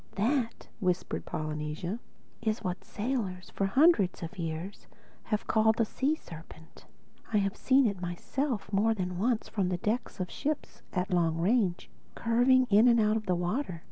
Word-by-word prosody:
"That," 230 +3 0
whispered 180 -3 -1
Polynesia, 155 +6 -3 0.4
"is 220 -1 -1
what 180 -2 -3
sailors 205 -6 -3
for 195 - 0
hundreds 260 - +4
of 170 +4 -7
years 165 +4 -5 0.4
have 215 -1 -1
called 220 0 +3
the 230 - +3
Sea 275 +7 0
serpent. 160 - -13 0.4
I've 200 -1 +1
seen 270 0 +4
it 200 -5 -1
myself 205 - -3
more 220 +3 +3
than 180 -2 -3
once 230 +2 +1
from 195 -4 -1
the 180 - 0
decks 220 +6 -2
of 180 -1 -3
ships, 300 +1 -3
at 185 +1 -2
long 165 -2 +2
range, 185 0 +1 0.3
curving 245 +3 +4
in 215 +4 +7
and 235 -1 +5
out 215 0 +3
of 215 -2 -3
the 180 - +2
water. 180 - -2
205 Hz, 160 wpm, -30 LUFS, 180-235 Hz, 0.4 s, in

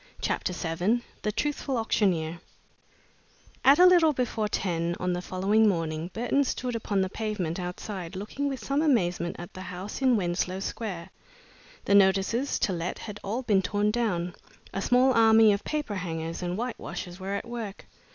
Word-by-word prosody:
CHAPTER - - -1
VII 180 +7 0 0.2
THE 210 - -1
TRUTHFUL 275 +3 -2
AUCTIONEER 175 -7 0 1.2
At 275 +2 +7
a 360 - +8
little 345 -4 +6
before 240 -4 -1
ten 170 -4 -1
on 180 0 0
the 175 - -2
following 200 +4 +2
morning, 165 -2 -2
Burton 245 +6 +1
stood 255 -2 -3
upon 205 -3 0
the 190 - 0
pavement 195 -5 -3
outside, 180 0 -5
looking 245 +9 -3
with 260 -6 -5
some 280 +2 +1
amazement 180 - +1
at 175 - -9
the 185 - -8
house 185 +5 -6
in 255 -3 +4
Wenslow 180 0 -1
Square. 195 -4 -5 0.7
The - - +2
notices 200 +7 +3
"To 190 - 0
Let" 170 +1 -3
had 210 -1 -8
all 225 +6 -2
been 205 -5 +3
torn 205 +2 +1
down. 180 -7 -1 0.4
A 195 - -2
small 255 +4 +4
army 220 -2 +6
of 200 - -3
paper 300 -8 -2
hangers 165 -2 -4
and 180 +1 -2
white 245 +1 -3
washers 175 +1 -6
were 195 +1 -3
at 200 - -4
work. 230 -4 -6
200 Hz, 170 wpm, -27 LUFS, 180-235 Hz, 1.2 s, a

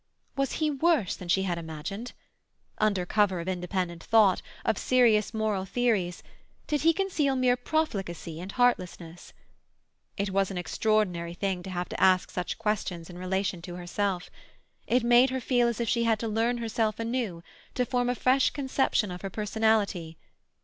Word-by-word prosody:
Was 275 -1 0
he 310 -1 0
worse 295 - +2
than 180 - -9
she 190 +3 +2
had 175 -3 -1
imagined? 165 +9 -6 0.7
Under 200 -4 +1
cover 200 -2 +2
of 170 - -6
independent 180 -1 -3
thought, 210 -5 +4 0.2
of 220 - +1
serious 235 -5 +3
moral 215 -3 -1
theories, 195 -4 0 0.4
did 295 -1 -1
he 330 - +5
conceal 330 -7 0
mere 255 -1 +3
profligacy 195 - -2
and 185 +2 -6
heartlessness? 180 -8 -1 0.9
It 200 -1 -1
was 195 0 +1
an 190 - -5
extraordinary 180 -3 0
thing 190 -1 -2
to 190 - -8
have 180 -1 -3
to - - -5
ask 185 -1 +4
such 180 - -3
questions 190 -6 -2
in 175 - -10
relation 185 -1 -1
to 175 +1 -8
herself. 180 +1 -2 0.6
It 245 +1 +2
made 240 +2 +6
her 260 +1 -2
feel 245 -1 +2
as 235 -1 -2
if 235 - -1
she 235 +2 +1
had 225 -1 +2
to 230 - -2
learn 225 +3 +1
herself 225 -2 -1
anew, 230 -7 -2 0.3
to 250 - +1
form 245 -1 0
a 245 - 0
fresh 255 +2 +3
conception 265 -7 0
of 180 - -7
her 195 - -4
personality. 210 -5 0
210 Hz, 170 wpm, -28 LUFS, 180-245 Hz, 0.9 s, made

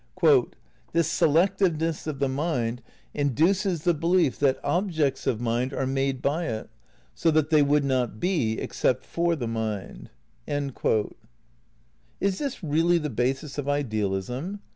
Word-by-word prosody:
"This 170 -2 +2
selectiveness 165 -1 +2
of 150 -3 -3
the 140 0 +1
mind 130 -4 -1 0.3
induces 165 - +1
the 175 - +3
belief 165 -3 +1
that 135 -2 +2
objects 155 -4 0
of. 110 - +1
mind 120 +3 -1
are 135 - -1
made 135 0 -1
by 160 +5 0
it, 110 -2 -5 0.4
so 165 - +1
that 155 -1 +2
they 155 -2 +6
would 145 0 +3
not 125 -5 0
be 150 - +1
except 130 0 -1
for 170 0 0
the 125 -7 -4
mind." 110 -3 -4 0.2
' - - -39 1.7
Is 195 -1 0
this 275 -8 -4
really 165 +3 +3
the 150 -3 -3
basis 135 +5 -2
of 145 0 -3
idealism? 125 - -2
145 Hz, 140 wpm, -26 LUFS, 125-170 Hz, 1.7 s, they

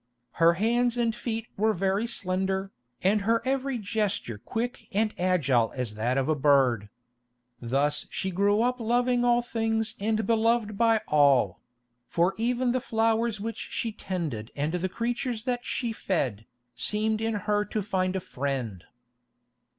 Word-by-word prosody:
Her 165 +1 +7
hands 235 +6 +1
and 230 -1 +1
feet 230 -1 -3
were 220 +2 +2
very 195 +5 0
slender, 190 -1 -2 0.3
and 205 +3 +3
her 230 +3 +2
every 270 0 0
gesture 205 - -2
quick 230 - -4
and 215 +1 +1
agile 140 -11 +2
as 125 -5 -3
that 120 +5 -1
of 135 - +1
a 155 - +3
bird. 130 -7 +3 0.7
Thus 140 +5 0
she 190 - -2
grew 205 +4 +2
up 250 +1 0
loving 245 +2 +2
all 240 0 +3
things 225 -2 -1
and 220 +1 0
beloved 225 -1 +2
by 225 0 +3
all; 140 -10 +4 0.5
for 175 +3 +2
even 245 +2 +1
the 255 0 0
flowers 225 -1 +1
which 225 +1 -4
she 230 - -3
tended 160 - -4
and 150 +3 -1
the 180 +1 -1
creatures 235 +2 -2
that 245 -1 -2
she 235 -2 -2
fed, 130 - -2 0.3
seemed 215 +1 0
in 225 0 0
her 210 0 0
to 210 0 -3
find 185 -1 0
a - - +1
friend. 125 - -4
210 Hz, 150 wpm, -27 LUFS, 160-230 Hz, 0.7 s, Her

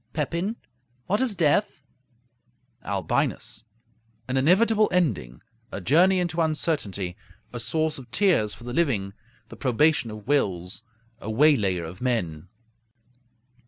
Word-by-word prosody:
Pepin 170 - -2 0.5
What 205 +5 +1
is 250 -6 +1
death? 160 -2 +1 1.0
Albinus 100 +3 -2 0.6
An 130 - -2
inevitable 210 +10 +4
ending; 115 - -1 0.3
a - - -4
journey 175 - +4
into 170 -2 -1
uncertainty; 130 - -1 0.4
a 120 - -4
source 155 +5 -1
of 130 -2 -13
tears 125 - +2
for - - -14
the 120 0 -6
living; 115 -12 0 0.4
the - - -10
probation 140 0 +2
of 105 0 -9
wills; 95 -11 0 0.4
a 110 - -7
waylayer 110 - +3
of 85 +3 -9
men. 90 -11 -2
130 Hz, 120 wpm, -25 LUFS, 100-170 Hz, 1.0 s, inevitable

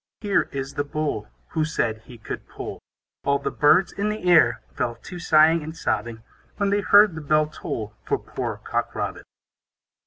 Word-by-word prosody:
Here 205 -2 +1
is 135 0 -4
the 145 - -1
Bull, 145 -8 -3 0.2
Who 160 - 0
said 115 -8 -1
he 120 - -12
could 110 - -7
pull. - - -7 0.4
All 140 0 +2
the 140 - -3
birds 150 +6 +4
in 205 +1 -2
the 215 +1 -4
air 160 -9 +5
Fell 120 - -2
to 175 +9 -9
sighing 160 0 +5
and 160 +2 -7
sobbing, 110 +1 -2 0.3
When 200 -1 +1
they 205 0 +2
heard 205 0 +6
the 160 - -6
bell 155 +1 +3
toll 110 -8 -6
For - - +2
poor - - -5
Cock - - -2
Robin. - - -3
155 Hz, 180 wpm, -24 LUFS, 125-180 Hz, 0.4 s, heard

